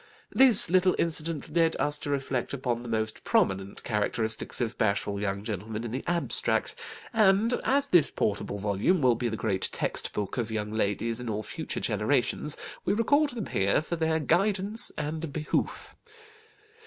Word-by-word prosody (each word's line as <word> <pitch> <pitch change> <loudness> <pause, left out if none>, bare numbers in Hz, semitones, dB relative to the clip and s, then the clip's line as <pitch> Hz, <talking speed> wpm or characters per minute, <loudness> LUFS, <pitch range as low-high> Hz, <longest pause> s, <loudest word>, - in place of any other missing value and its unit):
This 255 -8 +7
little 185 0 +3
incident 165 -2 -1
led 165 -1 +3
us 145 0 +1
to - - -5
reflect 135 -3 -2
upon 125 -3 -2
the 120 - -8
most 110 -1 -3
prominent 95 +1 0
characteristics 110 0 0
of 120 -2 -2
bashful 100 -1 -1
young 100 -1 -3
gentlemen 110 +1 -5
in 120 - -5
the 130 +3 -4
abstract; 170 -1 0 0.4
and 215 +1 +3
as 280 +1 +2
this 175 - +4
portable 100 0 -2
volume 105 - 0
will 125 -1 +5
be 120 +1 -2
the 110 - -4
great 100 -4 -1
text - - -2
book 105 +2 -4
of 115 -2 -2
young 105 -1 -3
ladies 110 +2 -1
in 120 - -5
all 110 0 -3
future - - -5
generations, - - 0 0.3
we 195 - 0
record 285 +7 +2
them 235 -6 -5
here 95 +1 +1
for 160 +3 -4
their 160 -1 0
guidance 195 - +3
and 155 +1 -4
behoof. 155 +1 -3
130 Hz, 165 wpm, -27 LUFS, 110-175 Hz, 0.4 s, This